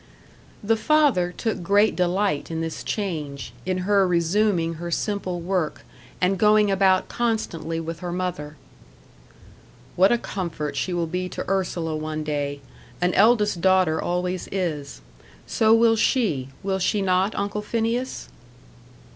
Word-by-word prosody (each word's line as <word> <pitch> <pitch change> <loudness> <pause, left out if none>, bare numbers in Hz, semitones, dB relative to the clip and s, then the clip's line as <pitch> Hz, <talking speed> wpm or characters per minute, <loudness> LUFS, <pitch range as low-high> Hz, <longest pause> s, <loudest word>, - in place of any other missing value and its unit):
The 225 +2 +2
father 275 -10 +3
took 220 +3 -3
great 200 +4 +3
delight 180 -3 0
in 165 -1 -3
this 165 -1 -4
change, 155 -9 -4
in 185 -1 0
her 200 -1 +3
resuming 175 0 +1
her 175 - -4
simple 185 0 -2
work, 175 -2 -2 0.4
and 185 +1 +1
going 210 -1 +4
about 190 -1 +3
constantly 175 -9 -2
with 165 0 -5
her 180 -1 -5
mother. 175 -4 -4 1.4
"What 190 +4 +5
a 240 - +4
comfort 160 -9 -4
she 185 - -2
will 175 -1 0
be 180 +2 -3
to - - -6
Ursula 175 -4 -1
one 155 0 -4
day 145 -1 -3 0.4
an 180 0 +1
eldest 210 -4 +3
daughter 185 -4 +3
always 180 +1 -2
is. 155 - -3 0.4
So 220 -1 +2
will 225 0 +5
she: 200 - +1
will 190 -1 -1
she 200 +2 +1
not, 185 +2 +1
Uncle 205 +1 -2
Phineas?" 230 +4 -2
185 Hz, 140 wpm, -24 LUFS, 165-205 Hz, 1.4 s, What